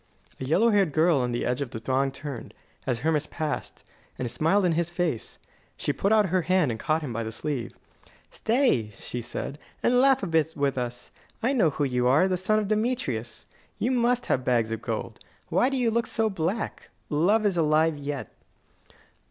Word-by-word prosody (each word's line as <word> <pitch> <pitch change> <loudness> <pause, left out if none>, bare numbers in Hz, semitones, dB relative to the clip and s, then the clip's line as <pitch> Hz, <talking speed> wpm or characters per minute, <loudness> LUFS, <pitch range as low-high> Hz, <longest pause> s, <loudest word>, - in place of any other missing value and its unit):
A 130 - -4
yellow 200 - +3
haired 195 -7 +3
girl 160 0 +4
on 125 -1 0
the 120 - -1
edge 125 +3 -1
of 140 - -2
the 115 - -6
throng 135 +4 0
turned, 135 -2 -7 0.3
as 120 -3 -1
Hermas 155 0 +1
passed, 155 -3 -4 0.3
and 125 -2 -3
smiled 175 +9 +2
in 175 - +3
his 170 +1 0
face. 175 -9 -2 0.4
She - - -1
put 200 - 0
out 210 -3 +4
her 185 +1 +2
hand 180 -5 +2
and 110 - -5
caught 155 0 0
him 130 -5 -4
by 115 - -2
the 110 0 -4
sleeve. 120 0 -4 0.6
"Stay," 225 - +1
she 120 - -5
said, 135 +4 -5 0.2
"and 245 +1 +4
laugh 270 -3 +4
a - - +1
bit 160 -2 +1
with 140 -2 0
us. 120 -1 -5 0.3
I 255 +4 +2
know 205 - +4
who 145 0 -2
you 125 -2 +1
are 145 +9 +5
the 185 - +1
son 190 +4 +1
of 210 -2 0
Demetrius. 205 - -2 0.3
You 245 - 0
must 245 0 +2
have 130 - 0
bags 120 -3 +1
of 115 - -3
gold. - - -4 0.3
Why 250 - +3
do 270 - -1
you 240 -3 +2
look 235 +1 0
so 220 -1 0
black? 190 +4 -3 0.2
Love 200 +9 +3
is 200 -3 +2
alive 160 -1 +3
yet." 145 -1 -5
155 Hz, 200 wpm, -26 LUFS, 130-205 Hz, 0.6 s, are